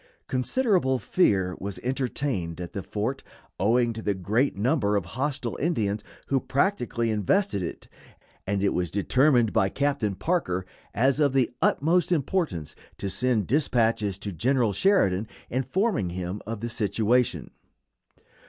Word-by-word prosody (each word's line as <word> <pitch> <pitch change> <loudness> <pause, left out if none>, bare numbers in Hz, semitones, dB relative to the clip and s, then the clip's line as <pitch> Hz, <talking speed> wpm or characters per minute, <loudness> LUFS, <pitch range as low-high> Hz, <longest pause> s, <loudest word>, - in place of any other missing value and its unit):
Considerable 135 - +1
fear 95 - +1
was 100 0 -5
entertained 125 - -2
at 90 -1 -6
the 100 - -3
fort, 110 +8 -3 0.4
owing 120 +3 +2
to 110 - -6
the 105 -2 0
great 105 +8 0
number 105 -2 +1
of 100 -4 0
hostile 130 - -3
Indians 110 -10 0 0.2
who 135 - +1
practically 125 - 0
invested 110 - +1
it, 85 - -6 0.6
and 100 0 0
it 100 - +2
was 90 -1 -1
determined 120 - +3
by 100 -3 +3
Captain 135 -8 0
Parker 95 - -1 0.3
as 130 +6 +2
of 145 -3 +3
the 130 -3 +2
utmost 170 +5 +2
importance 150 - -1 0.2
to 100 - -3
send 115 0 +1
dispatches 115 - +1
to 100 0 -5
General 115 - +1
Sheridan, 105 - +2 0.2
informing 135 - 0
him 90 +3 -4
of 110 -1 -4
the 120 - -3
situation. 115 +2 +1
115 Hz, 135 wpm, -26 LUFS, 100-135 Hz, 0.6 s, determined